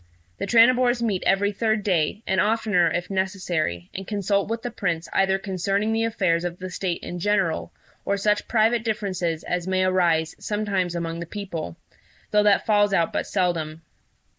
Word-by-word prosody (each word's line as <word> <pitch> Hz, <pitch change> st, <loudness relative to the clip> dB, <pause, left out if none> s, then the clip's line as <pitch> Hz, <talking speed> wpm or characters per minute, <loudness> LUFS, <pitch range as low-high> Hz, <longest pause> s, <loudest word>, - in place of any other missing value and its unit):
The -, -, -3 dB
Tranibors 245 Hz, +1 st, +4 dB
meet 205 Hz, -5 st, 0 dB
every 200 Hz, +1 st, +3 dB
third 220 Hz, 0 st, 0 dB
day, 190 Hz, +2 st, 0 dB
and 190 Hz, 0 st, +2 dB
oftener 210 Hz, -5 st, +2 dB
if 175 Hz, +4 st, -3 dB
necessary, 185 Hz, -, -2 dB
and 195 Hz, 0 st, -6 dB
consult 200 Hz, -1 st, 0 dB
with 230 Hz, 0 st, -3 dB
the 245 Hz, -, -3 dB
Prince 175 Hz, -7 st, -2 dB
either 190 Hz, 0 st, +3 dB
concerning 195 Hz, +2 st, -1 dB
the 225 Hz, 0 st, +1 dB
affairs 180 Hz, -7 st, +1 dB
of 175 Hz, 0 st, -4 dB
the 185 Hz, 0 st, -7 dB
State 180 Hz, -1 st, -3 dB
in 175 Hz, -, -5 dB
general, 195 Hz, -3 st, 0 dB, 0.3 s
or 200 Hz, -, 0 dB
such 210 Hz, +1 st, +1 dB
private 225 Hz, 0 st, +2 dB
differences 185 Hz, -7 st, -2 dB
as 180 Hz, 0 st, -2 dB
may 185 Hz, 0 st, +1 dB
arise 170 Hz, -4 st, +2 dB
sometimes 200 Hz, -4 st, -1 dB
among 165 Hz, -1 st, -3 dB
the 170 Hz, -, -6 dB
people, 170 Hz, -, -6 dB, 0.5 s
though 210 Hz, -, +4 dB
that 205 Hz, -1 st, +3 dB
falls 205 Hz, -2 st, +3 dB
out 170 Hz, -2 st, +1 dB
but -, -, -2 dB
seldom. 165 Hz, -4 st, -1 dB
195 Hz, 170 wpm, -24 LUFS, 175-210 Hz, 0.5 s, Tranibors